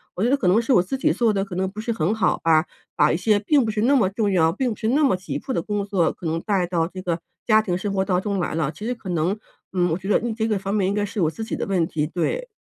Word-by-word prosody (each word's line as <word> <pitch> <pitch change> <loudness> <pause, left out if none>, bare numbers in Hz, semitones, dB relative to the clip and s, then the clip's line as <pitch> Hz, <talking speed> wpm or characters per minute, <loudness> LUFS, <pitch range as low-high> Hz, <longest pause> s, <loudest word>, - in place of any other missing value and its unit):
我 190 - -1
觉 240 - +3
得 275 - +4
可 190 - -1
能 195 +6 +4
是 235 - -2
我 180 - +6
自 230 +9 -3
己 265 - +2
做 235 -2 +2
得 195 -1 0
可 195 -3 -8
能 190 +1 -1
不 210 - -8
是 230 - -2
很 185 -1 0
好 205 -5 +1
吧， 160 0 +4 0.3
把 150 - +4
一 - - +1
些 210 +3 +2
并 275 +6 +3
不 220 - -1
是 210 0 -2
那 275 +4 +4
么 215 -8 +3
重 205 +1 -1
要， 165 -4 +3
并 250 +7 -1
不 - - -4
是 220 - -2
那 290 +5 +3
么 265 -9 +4
急 185 +1 -5
迫 265 - -5
的 - - 0
工 205 -1 -2
作 195 -4 +1
可 - - -12
能 160 +1 -1
带 195 -3 0
到 170 -2 0
这 185 +1 -8
个 175 -2 -2 0.3
家 215 -1 +5
庭 180 -5 -2
生 200 +2 -3
活 190 -1 +1
当 180 -2 +1
中 200 -1 -2
来 175 - -2
了。 155 -3 0
其 165 - -11
实 245 - -1
可 210 -5 -9
能， 175 +4 0 0.4
嗯， 180 -1 +2
我 160 - 0
觉 190 - -8
得， - - +4
嗯， 235 -1 -1
这 220 0 -1
个 215 -2 +1
方 195 +1 -3
面 200 -3 +1
应 195 - 0
该 205 0 0
是 205 0 -4
我 160 - +3
自 225 - -6
己 - - -3
的 - - -3
问 185 -4 +1
题， 150 -2 -1
对。 330 - -2
195 Hz, 355 characters per minute, -23 LUFS, 180-220 Hz, 0.4 s, 我